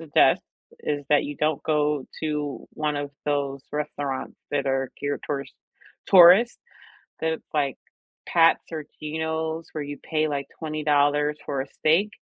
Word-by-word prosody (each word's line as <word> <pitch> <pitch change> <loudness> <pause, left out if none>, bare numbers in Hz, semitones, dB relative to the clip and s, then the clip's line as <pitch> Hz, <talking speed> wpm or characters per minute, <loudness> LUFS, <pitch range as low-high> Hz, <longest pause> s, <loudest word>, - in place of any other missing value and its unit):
suggest 160 -3 +4 0.4
is 145 -1 -2
that 150 - +5
you 145 0 -5
don't 155 0 0
go 150 -3 +1
to 150 -2 -3
one 150 -1 -1
of 145 0 -3 0.2
those 140 -1 -1
restaurants 145 -2 -3 0.2
that 140 -1 0
are 135 -1 0
geared 145 0 -2
towards 140 -2 -3 0.5
tourists, 190 +6 +7 0.6
that's, 160 0 -1
like, 140 -4 +1 0.5
Pat's 165 -1 +4
or 155 -2 -4 0.2
Geno's, 160 +1 -3
where 150 -2 -4
you 145 0 -7
pay, 155 -1 0
like, 140 -1 -2
$20 150 -1 +1
for 140 -2 -1
a - - -9
steak. 170 +10 +2
150 Hz, 140 wpm, -25 LUFS, 145-160 Hz, 0.6 s, tourists